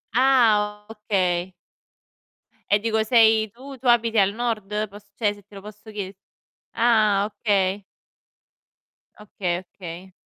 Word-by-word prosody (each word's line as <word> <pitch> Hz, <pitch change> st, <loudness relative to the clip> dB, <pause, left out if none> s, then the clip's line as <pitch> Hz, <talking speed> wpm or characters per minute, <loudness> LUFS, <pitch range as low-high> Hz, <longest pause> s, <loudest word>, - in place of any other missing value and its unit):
Ah, 215 Hz, -6 st, +3 dB
okay. 190 Hz, -5 st, -1 dB, 1.2 s
E -, -, +7 dB
dico 220 Hz, 0 st, 0 dB
sei 220 Hz, -2 st, +4 dB
tu 270 Hz, +2 st, -11 dB
tu 255 Hz, -, -5 dB
abiti 230 Hz, -1 st, +3 dB
al 195 Hz, 0 st, +3 dB
nord? 225 Hz, -4 st, -2 dB, 0.2 s
Poss 205 Hz, +1 st, -14 dB
cioè 210 Hz, -3 st, +1 dB
se 205 Hz, -1 st, -17 dB
te 205 Hz, +1 st, -18 dB
lo 195 Hz, -, -9 dB
posso 210 Hz, +2 st, -12 dB
chiede 200 Hz, -2 st, -6 dB, 0.6 s
ah, 215 Hz, -4 st, +3 dB
okay! 205 Hz, -2 st, 0 dB, 1.4 s
Okay, 185 Hz, -4 st, -3 dB
okay. 180 Hz, +1 st, -10 dB
210 Hz, 125 wpm, -23 LUFS, 195-225 Hz, 1.4 s, E